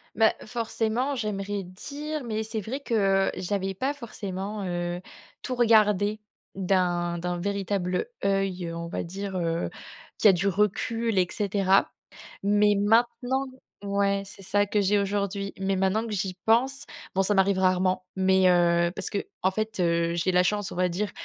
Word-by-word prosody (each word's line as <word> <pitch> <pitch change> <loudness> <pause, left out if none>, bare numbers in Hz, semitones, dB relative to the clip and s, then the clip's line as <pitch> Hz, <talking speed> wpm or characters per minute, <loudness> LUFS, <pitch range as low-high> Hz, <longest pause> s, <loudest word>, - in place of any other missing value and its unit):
Bah, 220 +1 +5
forcément, 235 +3 -1
j'aimerais 205 -3 -3
dire 290 +10 -6
mais 220 -1 -2
c'est 220 0 -3
vrai 255 +8 -5
que 195 -6 +2
j'avais 195 +1 -2
pas 265 +8 -1
forcément, 205 -5 -5
heu, 175 0 -2 0.4
tout 255 - -3
regardé 215 -3 +3 0.3
d'un 175 -2 0
d'un 175 +1 -2
véritable 195 - -1 0.2
œil, 195 -3 0
on 170 0 -5
va - - -3
dire, 195 +2 -5
heu, 170 -1 -1 0.5
qui 210 - +6
a - - +8
du 190 +2 +1
recul 210 +2 0
et 180 - +4
cetera. 195 -2 +2 0.5
Mais 205 +1 +4
maintenant 240 +5 +2 0.4
ouais, 200 0 +1
c'est 195 0 -12
ça 205 +2 +1
que 210 +1 +1
j'ai 205 +1 +3
aujourd'hui. 200 0 -1
Mais 195 0 0
maintenant 195 +4 +1
que 220 - -5
j'y 195 -2 -2
pense, 260 +5 +2 0.3
bon, 190 - +3
ça 205 +2 +2
m'arrive 195 0 +3
rarement. 185 0 +2
Mais, 190 0 +4
heu, 170 -1 +3
parce 195 - -4
qu'en 190 -2 -2
fait, 215 +1 -3
heu, 170 -1 +1
j'ai 175 +2 0
la 180 0 +5
chance, 205 +1 -1
on - - -7
va 180 0 +2
dire, 200 +4 -2
200 Hz, 160 wpm, -26 LUFS, 185-215 Hz, 0.5 s, a